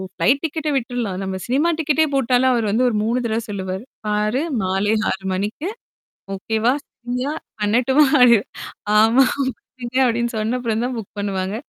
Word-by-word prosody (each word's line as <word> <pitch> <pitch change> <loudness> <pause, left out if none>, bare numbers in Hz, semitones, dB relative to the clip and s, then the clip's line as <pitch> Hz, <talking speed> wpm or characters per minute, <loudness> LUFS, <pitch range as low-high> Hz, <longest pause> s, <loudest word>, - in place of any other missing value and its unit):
Flight 260 +12 +2
டிக்கெட்ட 315 -1 -2
விட்ருலாம். 240 -6 -2
நம்ம 190 0 -3
cinema 285 +7 +1
டிக்கெட்டே 315 0 +2
போட்டாலும், 255 0 +3
அவரு 230 -3 0
வந்து 240 +5 +2
ஒரு 230 - -2
3 235 +3 0
தடவ 225 0 -1
சொல்லுவாரு. 190 0 -4 0.2
பாரு! 210 +5 0 0.2
மாலை 195 +3 +1 0.2
6:00 190 0 -3
மணிக்கு 210 - -3 0.7
ஓகேவா? 220 +5 0 0.4
ஃப்ரியா? 250 +4 -1 0.3
பண்ணட்டுமா? 250 +8 +3 0.2
அப்பிடின்னு 235 -4 +6 0.5
ஆமா. 225 +5 +5 0.2
புக் 260 -2 -1 0.2
பண்ணுங்க 245 +1 -3
அப்பிடின்னு 235 0 0
சொன்ன 225 +4 -1
அப்புறம் 230 -1 -1
தான் 255 -1 -4
புக் 210 -2 -9
பண்ணுவாங்க. 195 -1 -2
235 Hz, 155 wpm, -20 LUFS, 210-255 Hz, 0.7 s, அப்பிடின்னு